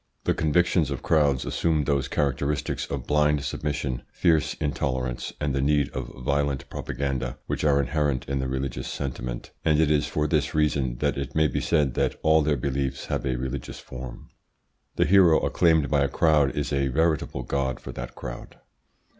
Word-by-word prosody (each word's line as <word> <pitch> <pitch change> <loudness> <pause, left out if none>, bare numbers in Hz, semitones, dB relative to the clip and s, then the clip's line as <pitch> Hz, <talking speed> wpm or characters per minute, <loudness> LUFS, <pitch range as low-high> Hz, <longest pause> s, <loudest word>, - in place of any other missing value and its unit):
The - - +2
convictions 85 0 +2
of 70 -3 -4
crowds 70 -5 +2
assume 80 -3 +1
those 70 -1 0
characteristics 70 +1 -1
of 70 -3 -4
blind 75 -1 +2
submission, 70 -3 -2
fierce 80 -3 +2
intolerance, 65 -4 -2
and 75 -2 -1
the 70 - 0
need 70 0 +2
of - - -5
violent 70 -1 0
propaganda 65 -3 -3
which - - -3
are 70 -2 +4
inherent 70 0 0
in 70 0 -1
the 65 - -1
religious 65 0 -3
sentiment, 60 -3 -5
and 75 -2 +3
it 80 -1 +3
is 75 -1 +2
for 75 +1 -1
this 75 -2 0
reason 70 -5 +1
that - - +1
it 70 -1 -5
may 80 -1 +4
be 65 - -2
said 75 -6 +2
that - - 0
all 80 0 +5
their 75 -1 +1
beliefs 70 +1 -2
have - - -1
a 65 - 0
religious 65 +1 -4
form. 60 -1 -9 0.7
The - - +3
hero 90 -4 +6
acclaimed 80 -5 +2
by 70 -2 +3
a 70 - +2
crowd 75 -2 +3
is 75 0 -2
a 70 0 +1
veritable 75 -2 0
god 65 +1 -1
for - - -8
that 60 0 -7
crowd. - - -8
70 Hz, 180 wpm, -26 LUFS, 65-75 Hz, 0.7 s, hero